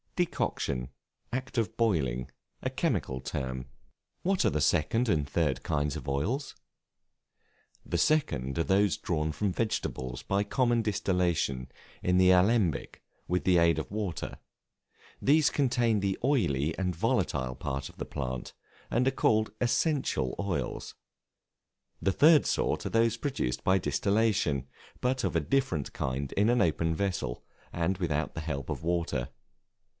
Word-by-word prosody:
Decoction, 65 - -1 0.4
act 130 +1 -4
of 110 -1 -1
boiling 65 - +1 0.3
a - - -1
chemical 65 0 -1
term. 65 0 -4 0.5
What 190 +1 +1
are - - +5
the 75 - 0
second 115 +12 +2
and 75 -7 +1
third 75 -5 0
kinds 75 -3 0
of - - -7
Oils? 100 - -1 1.3
The 85 - -1
second 75 - +1
are - - +3
those 95 +2 +2
drawn 80 -2 -1
from 95 +6 -1
vegetables 65 - -2
by 100 +1 0
common 120 +2 +2
distillation 85 - 0 0.3
in 90 0 +3
the 95 0 +6
alembic, 95 - +2 0.2
with 90 +1 0
the 90 -2 +5
aid 85 0 +4
of - - -5
water; 100 -5 -3 0.8
these 150 +2 +4
contain 120 -6 +2
the 95 -1 0
oily 85 - +1
and 90 -2 -1
volatile 65 -5 0
part 70 0 -4
of - - -18
the - - -4
plant, 65 -3 -5 0.4
and 125 +3 +2
are - - +4
called 110 -5 +2
essential 125 - +1
oils. 100 -4 -3 1.1
The 95 - +2
third 150 - +6
sort - - 0
are - - -5
those 115 0 +3
produced 115 - -2
by 95 +1 +4
distillation, 100 - +1 0.3
but 125 +1 0
of - - -1
a - - +4
different 130 - 0
kind 65 +1 -2
in 105 +3 +3
an 120 0 +3
open 80 0 +1
vessel, 85 -10 -2 0.3
and 85 +3 0
without 80 -4 -1
the 80 - -3
help 70 -4 -4
of - - -4
water. 80 -7 -1
90 Hz, 145 wpm, -29 LUFS, 75-115 Hz, 1.3 s, the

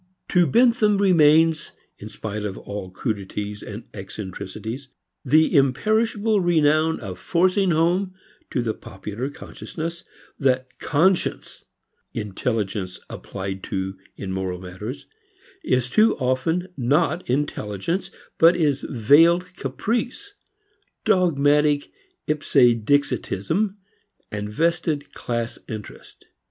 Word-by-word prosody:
To 175 -2 +4
Bentham 230 - +4
remains, 160 -4 +4 0.3
in - - -8
spite 105 -1 -5
of 100 -2 -4
all 100 -2 -6
crudities 105 0 -4
and 105 +2 -7
eccentricities, 105 +5 -7 0.4
the 155 +5 +4
imperishable 215 - +2
renown 160 -2 +3
of 95 -4 -7
forcing 185 - +2
home 175 +4 +1 0.3
to 125 - -1
the 110 -2 -1
popular 105 +8 -6
consciousness 165 +4 -7 0.4
that 130 -2 0
"conscience," 175 +5 0 0.5
intelligence 105 -3 -2
applied 95 0 -6
to 95 0 -3 0.2
in 95 -2 -5
moral 95 -1 -3
matters, 95 +8 -7 0.6
is 125 -1 +1
too 215 - +4
often 145 +8 0
not 150 +7 +1
intelligence 130 - -2 0.3
but 165 +2 +7
is 150 -5 +1
veiled 165 - +4
caprice, 245 - -3 0.7
dogmatic 150 -4 +3 0.3
ipse 150 -1 -3 0.3
dixitism, 145 - 0 0.6
vested 145 +8 -1
class 120 -1 -3
interest. 110 -2 -9
145 Hz, 95 wpm, -23 LUFS, 105-170 Hz, 0.7 s, but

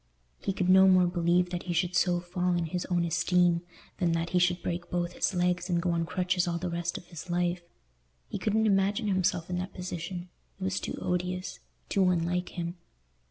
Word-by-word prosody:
He - - -1
could 185 -1 -1
no 190 +1 +7
more 185 -1 +6
believe 175 0 +2
that 175 -1 -2
he - - +1
should 180 +1 0
so 180 -1 +3
fall 180 +1 -1
in 170 -1 0
his 175 +2 -3
own 175 -1 +1
esteem 170 +1 +2 0.4
than 175 -3 +2
that 165 +1 -1
he 180 - +3
should 180 0 +2
break 175 0 -3
both 175 0 -1
his 190 - -1
legs 180 0 +1
and 175 -1 +2
go 175 +1 0
on 165 -1 0
crutches 180 0 0
all 170 -1 0
the 175 +1 -3
rest 170 0 -2
of - - -10
his 170 0 -10
life. 175 0 0 0.7
He - - -5
couldn't 220 +1 +1
imagine 200 +2 +2
himself 185 -3 +1
in 180 0 -2
that 185 +2 -5
position; 180 0 -5 0.3
it - - -6
was 190 +1 0
too - - -5
odious, 180 +1 -2 0.3
too 190 -2 +3
unlike 180 +1 0
him. 170 +1 -3
180 Hz, 205 wpm, -29 LUFS, 175-185 Hz, 0.7 s, no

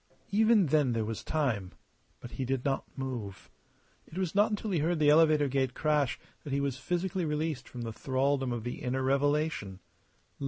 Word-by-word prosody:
Even 220 -1 +5
then 145 -4 +2
there 115 -1 0
was 110 0 -4
time. 120 -12 -1 0.5
But 120 - -9
he 135 - -4
did 130 0 -2
not 135 -1 0
move. 120 -8 -5 0.6
It 165 - -11
was 185 -3 -1
not 205 +2 +4
until 210 0 -3
he 175 - +1
heard 165 +3 +1
the 150 -1 +5
elevator 155 -2 +5
gate 130 -1 0
crash 150 -4 +1 0.2
that 145 - -7
he 140 - +1
was 140 -2 -1
physically 180 +6 -2
released 150 -3 -2
from 125 - -7
the 115 -1 -4
thraldom 135 +1 0
of 120 -2 -3
the 120 - -5
inner 130 +1 -1
revelation. 140 -7 0
140 Hz, 185 wpm, -30 LUFS, 125-160 Hz, 0.6 s, Even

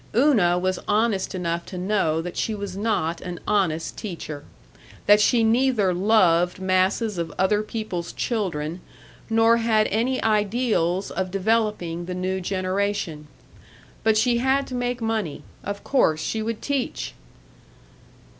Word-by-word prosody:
Una 220 -11 +4
was 185 0 -1
honest 210 -2 +1
enough 170 -1 -2
to 185 - -7
know 180 -4 +1
that 180 0 -6
she 220 - -1
was 200 -2 -5
not 195 -6 -1
an 175 -1 -6
honest 180 -6 0
teacher, 160 -7 -6 0.6
that 210 0 +6
she 230 +2 +4
neither 225 -4 +3
loved 180 -3 +3
masses 190 +2 +1
of 165 -2 -3
other 205 +3 +2
people's 215 -6 -4
children 175 -7 -2 0.5
nor 225 +1 +4
had 225 -2 +2
any 240 +5 0
ideals 210 -4 +1
of 190 -1 -2
developing 195 -4 0
the 180 +1 -4
new 185 +1 -2
generation. 185 -4 -2 0.8
But 220 -1 +3
she 235 +2 +3
had 265 +2 +2
to - - -7
make 245 -1 -2
money. 220 -8 -2 0.2
Of 200 0 -5
course 160 - +2
she 220 +7 -2
would 225 0 -4
teach! 280 -3 -2
200 Hz, 135 wpm, -24 LUFS, 180-225 Hz, 0.8 s, that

